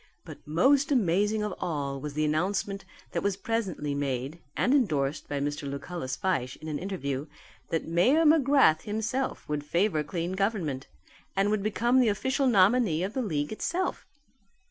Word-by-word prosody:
But - - -10
most 270 - +3
amazing 210 -2 +2
of 210 -2 -2
all 140 -6 -3
was 150 0 -6
the 155 0 +1
announcement 195 +5 -1 0.3
that - - -1
was 200 -1 0
presently 195 -9 -2
made, 140 +2 -3 0.2
and 250 - +3
endorsed 155 - +1
by 145 - -2
Mr. 145 0 -3
Lucullus 140 -1 -5
Fyshe 170 -11 -1
in 155 - -10
an 150 -2 -3
interview, 150 -7 -3 0.4
that 165 - -1
Mayor 245 - +3
McGrath 275 - +5
himself 220 +5 -3
would 150 -1 -2
favour 170 +1 +1
clean 170 +3 -3
government, 190 - -1 0.5
and 195 +1 +2
would 215 -1 +1
become 235 +5 +2
the 245 -3 +4
official 260 +6 0
nominee 200 -5 +4
of 195 +3 -3
the 260 - -1
league 150 -10 -2
itself. 350 +12 -2
185 Hz, 160 wpm, -28 LUFS, 150-220 Hz, 0.5 s, McGrath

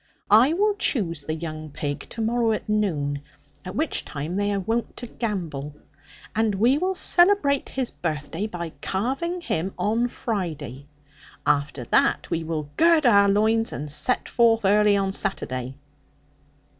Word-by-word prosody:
I 240 +8 +6
will 415 +4 +2
choose 170 - +1
the 155 +2 -3
young 155 -1 -6
pig 145 0 -4
to 230 - -5
morrow 230 0 +1
at 215 - -4
noon, 155 -10 0 0.4
at 185 +2 -7
which 310 +3 -1
time 150 +4 -5
they 205 +1 0
are 200 - 0
wont 225 +5 -2
to 245 - -6
gambol; 165 - -4 0.6
and 220 -2 +1
we 240 +8 +3
will 375 +2 0
celebrate 350 -7 +3
his 260 -2 -2
birthday 165 +4 -3
by 170 -5 -6
carving 270 - -2
him 190 - -2
on 230 +3 +1
Friday. 165 - -4 0.6
After 140 -2 0
that - - +1
we 165 - -1
will 155 -2 -4
gird 330 -2 +5
our 200 -4 +6
loins, 220 +3 +2
and 150 0 -5
set 250 - 0
forth 230 -3 +3
early 205 +1 +4
on 195 -1 0
Saturday.' 130 -10 -3
205 Hz, 150 wpm, -24 LUFS, 155-235 Hz, 0.6 s, I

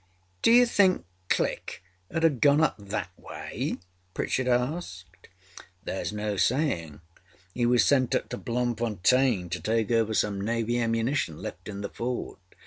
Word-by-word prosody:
â 95 0 -39
âDo - - +8
you 245 0 +7
think 200 - +3 0.2
Click - - -1 0.3
âud 165 - -1
haâ 145 -7 +3
gone 145 0 +5
up 160 - +2
that 100 -1 -4
way?â - - -5 0.4
Pritchard 130 -1 -1
asked. 120 - -2 0.6
âThereâs 95 - -3
no 105 -1 -3
saying. 85 - 0 0.5
He 120 -1 +1
was 120 0 +4
sent 130 -3 +3
up - - -1
to - - -4
Bloemfontein 120 -3 +1
to - - -2
take 110 0 0
over 110 -1 +2
some 100 -2 0
Navy 115 +2 0
ammunition 115 - 0
left - - -7
in 100 -1 -6
the 100 - -4
fort. 120 -2 -4
115 Hz, 150 wpm, -27 LUFS, 100-130 Hz, 0.6 s, âDo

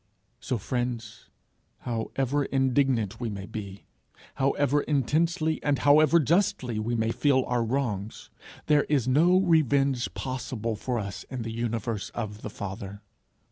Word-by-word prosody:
So, 125 - -2
friends, 120 0 -4 0.5
how 115 -2 -3
ever 135 +2 +1
indignant 130 -6 +1
we 120 -2 -2
may 100 -2 -6
be, 100 -2 -8 0.5
however 140 +1 +1
intensely 155 +3 0
and 145 -1 +1
however 155 +4 +5
justly 145 - +1
we 115 +2 -1
may 110 0 0
feel 130 0 +2
our 120 -1 0
wrongs, 110 -4 -3 0.3
there 150 -1 +3
is 135 -5 +1
no 170 +8 +5
revenge 140 -7 +2
possible 125 -4 -3
for 125 +3 -3
us 100 -3 -5
in 125 -3 -4
the 115 - -5
universe 115 -2 -3
of 110 -2 -5
the - - -5
Father. 100 0 -7
125 Hz, 140 wpm, -27 LUFS, 110-145 Hz, 0.5 s, however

